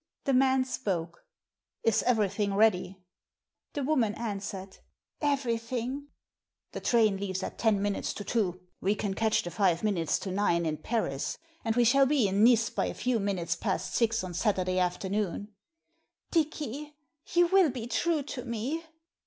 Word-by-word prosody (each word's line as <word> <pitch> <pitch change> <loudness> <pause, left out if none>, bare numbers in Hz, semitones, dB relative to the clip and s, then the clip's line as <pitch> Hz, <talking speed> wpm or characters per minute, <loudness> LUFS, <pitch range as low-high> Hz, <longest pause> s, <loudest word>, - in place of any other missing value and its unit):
The 275 - +1
man 260 0 +4
spoke. 175 -10 -3 0.3
" - - -59
Is 225 -1 +3
everything 205 -4 +1
ready? 190 -3 +2 0.3
" - - -57
The 285 - -1
woman 255 -7 +1
answered, 200 -3 -5 0.2
" - - -49
Everything." 250 +2 -3 0.6
"The - - -5
train 220 -4 +3
leaves 190 -1 -3
at - - -6
ten 220 -3 +3
minutes 205 -1 -1
to 205 - -5
two. 190 -6 -1 0.2
We 200 +2 +1
can 205 -1 -2
catch 220 +2 +1
the 175 - -5
five 175 -1 +2
minutes 185 -7 +1
to 190 - -4
nine 180 -3 +1
in 155 -1 -1
Paris, 145 - -2 0.3
and 225 -1 0
we 245 - +4
shall 270 +3 +5
be 270 -6 +3
in 195 +2 +2
Nice 230 -1 +5
by - - 0
a - - -5
few 245 -2 0
minutes 180 -5 -1
past 190 +2 -2
six 230 -2 +2
on 180 -1 -5
Saturday 185 -1 +1
afternoon." 190 +2 -1 0.4
" - - -48
Dicky, 300 -2 -2 0.4
you 350 0 +6
will 380 -3 +5
be 245 -3 -5
true 300 +6 0
to 265 -2 -6
me? 250 +7 -3
215 Hz, 170 wpm, -29 LUFS, 190-250 Hz, 0.6 s, you